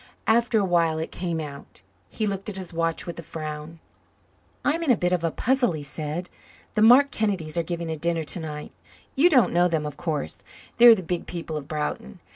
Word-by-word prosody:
After 235 +1 +3
awhile 170 -5 +2
it 160 - -4
came 170 -2 -3
out. 140 -9 -9 0.3
He 215 - -2
looked 195 0 -3
at 195 - -4
his 185 -2 -6
watch 165 0 -1
with 170 -1 -6
a - - -4
frown. 155 0 -7 0.9
"I'm 315 +3 +1
in 330 - -1
a 245 - +5
bit 180 0 0
of 180 -2 0
a 165 - +2
puzzle," 245 +2 +1
he 150 -2 -5
said. 155 +4 -5 0.5
"The 215 - +1
Mark 255 +6 +7
Kennedys 190 -8 -2
are 170 - +2
giving 170 0 -4
a - - -2
dinner 165 +1 -1
to 155 - -4
night. 150 -2 -6 0.4
You 310 +6 +5
don't 265 -8 +4
know 175 +1 +4
them, 160 -3 -1
of 150 -1 -6
course. 160 -5 -3 0.4
They're 235 -1 +9
the 190 - -6
big 175 0 -3
people 165 -2 -5
of 145 -2 -5
Broughton. 150 - -4
170 Hz, 210 wpm, -25 LUFS, 155-205 Hz, 0.9 s, They're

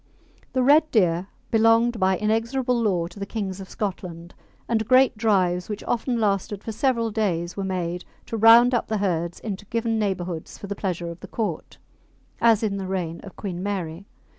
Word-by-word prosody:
The 255 -1 +2
red 300 +4 +5
deer 180 - +2 0.2
belonged 225 +1 +4
by 190 -1 +3
inexorable 235 +3 0
law 185 -6 +1
to 185 +4 -10
the 200 - -3
kings 200 -4 -4
of 190 - -10
Scotland, 175 -4 -5 0.3
and 220 -2 0
great 255 0 +5
drives, 185 -5 +1
which 210 -1 -5
often 240 0 -1
lasted 200 -1 -1
for 225 - -4
several 230 -1 0
days, 180 -6 -1
were 195 - -3
made 180 -2 -3 0.2
to - - -5
round 230 +3 +7
up 240 - +1
the 220 - -1
herds 175 -4 -1
into 205 -2 -5
given 225 +1 -1
neighbourhoods 180 -5 -3
for - - -8
the 200 - -3
pleasure 175 -4 -3
of 170 - -10
the - - -10
court, 210 -8 -4 0.6
as 230 -2 +4
in 200 -2 0
the 190 -1 -4
reign 175 -3 -3
of 195 - -11
Queen 180 -4 -5
Mary. 190 -2 -4
205 Hz, 185 wpm, -24 LUFS, 180-225 Hz, 0.6 s, round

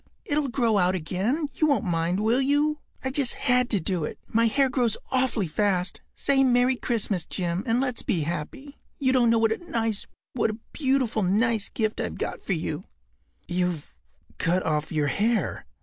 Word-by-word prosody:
It’ll 295 -1 +1
grow 235 -5 +2
out 180 0 +2
again—you 240 - -1
won’t 280 -5 +2
mind, 175 +2 0
will 230 +5 +3
you? 295 +2 +2 0.2
I 265 - -1
just 265 -3 +4
had 250 -1 +1
to 205 - +1
do 175 -1 -1
it. - - -4
My 230 +1 +3
hair 275 +4 +3
grows 245 -4 0
awfully 255 -5 +1
fast. 180 +1 0
Say 270 -1 +4
‘Merry 250 0 +3
Christmas!’ 215 -7 -1
Jim, 175 -1 -2
and 230 +2 +2
let’s 255 -3 -1
be 170 - 0
happy. 175 - -5 0.2
You 260 -2 +2
don’t 245 -3 +4
know 230 - +4
what 225 -1 +3
a 220 - -1
nice—what 225 - -2
a 215 - -4 0.2
beautiful, 260 -6 +1
nice 210 +3 +1
gift 220 -1 -1
I’ve 85 - -4
got - - -4
for - - -1
you.” - - -3 0.6
“You’ve 180 - -2 0.4
cut 180 +3 +1
off 150 -1 -1
your 155 -3 +1
hair? 220 +6 0
225 Hz, 175 wpm, -26 LUFS, 185-260 Hz, 0.6 s, just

